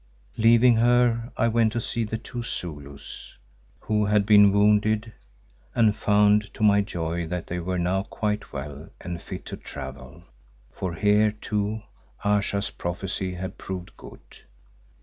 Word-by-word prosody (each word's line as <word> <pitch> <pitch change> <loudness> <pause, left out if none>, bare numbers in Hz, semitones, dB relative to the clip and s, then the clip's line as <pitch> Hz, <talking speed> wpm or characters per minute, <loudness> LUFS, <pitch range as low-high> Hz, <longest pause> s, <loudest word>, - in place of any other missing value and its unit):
Leaving 115 +1 +5
her 120 0 +3
I 115 - +3
went 115 -1 +2
to 120 - -1
see 115 0 -2
the 110 +1 -3
two 120 +1 -7
Zulus 75 - -7 0.4
who 105 -1 +1
had 105 0 +2
been 105 -1 +7
wounded 105 +2 +2 0.6
and 110 -3 +4
found 105 0 +3
to - - -3
my 100 -1 +5
joy 85 -4 -3
that 90 0 -4
they 90 - -4
were 90 +1 -2
now 90 +2 +1
quite 105 0 -3
well 70 +2 -7
and 85 -1 -6
fit - - -8
to - - -6
travel, 65 +5 -9 0.5
for 85 +3 -4
here, 105 +3 +3
too, 105 0 -3 0.4
Ayesha's 100 0 +1
prophecy 90 +1 -4
had 95 +1 -6
proved 90 -1 -7
good. - - -13
105 Hz, 145 wpm, -25 LUFS, 90-110 Hz, 0.6 s, been